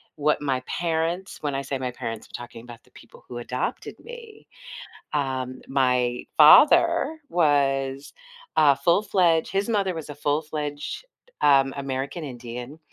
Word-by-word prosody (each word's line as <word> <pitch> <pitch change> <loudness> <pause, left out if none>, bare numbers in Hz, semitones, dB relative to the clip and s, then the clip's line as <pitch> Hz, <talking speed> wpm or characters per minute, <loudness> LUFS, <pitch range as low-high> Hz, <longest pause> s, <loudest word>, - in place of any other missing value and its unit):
what 150 0 +1
my 135 -3 -1
parents 170 +2 -2
when 145 -2 -2
I 135 - -2
say 135 0 -3
my 130 -1 -4
parents, 115 -2 -6
I'm - - -25
talking 120 -1 -11
about 120 -1 -13
the - - -27
people - - -17
who 120 - -8
adopted 125 +1 -4
me. 465 -3 -12 0.7
Um, 130 -3 -2
my 125 -2 +1
father 320 - +6
was 140 - +1 0.4
a 145 -2 +6
full-fledged 175 -2 +2
his 195 +3 0
mother 200 -5 0
was 160 -2 -7
a 145 - -7
full-fledged, 150 - -3 0.4
um, 135 -2 +4
American 140 +3 -4
Indian, 125 +1 -8
145 Hz, 140 wpm, -24 LUFS, 130-170 Hz, 0.7 s, father